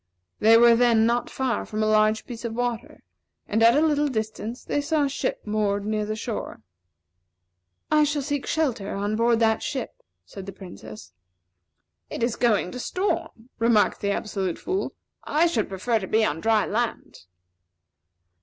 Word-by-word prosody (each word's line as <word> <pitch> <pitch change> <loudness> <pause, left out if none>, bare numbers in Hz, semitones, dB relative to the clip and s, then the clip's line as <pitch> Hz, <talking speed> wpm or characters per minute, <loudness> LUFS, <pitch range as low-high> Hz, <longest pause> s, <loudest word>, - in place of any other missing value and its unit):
They 225 +1 +6
were 235 0 +7
then 230 -2 +4
not 235 +1 0
far 255 -4 -1
from 215 0 -3
a - - +2
large 215 0 +2
piece 235 -2 -8
of 230 -1 -4
water; 245 -1 -4 0.4
and 220 +2 0
at 230 +4 +6
a 310 - +4
little 295 -1 +2
distance, 220 -1 -4
they 290 - -1
saw 300 +1 +1
a 280 - +1
ship 275 -1 -3
moored 205 -1 -1
near 215 0 -1
the 215 - -2
shore. 220 - -5 1.3
"I 305 0 +5
shall 295 -1 0
seek 285 -1 -3
shelter 250 -11 -1
on 205 +2 -1
board 230 +1 +2
that 220 -1 +3
ship," 275 - -3 0.3
said 195 -1 -10
the 195 - -6
Princess. 110 - -11 1.0
"It - - -4
is 235 -1 0
going 215 -7 +1
to 250 - -7
storm," 255 - -3
remarked 230 -2 +3
the 200 - -1
Absolute 195 -3 -2
Fool. 380 +1 -3 0.3
"I 310 +3 +2
should 280 -11 0
prefer 215 +4 0
to 190 - -6
be 220 +2 +2
on 160 -3 -2
dry 220 0 +2
land." 235 +2 -3
225 Hz, 170 wpm, -25 LUFS, 210-250 Hz, 1.3 s, were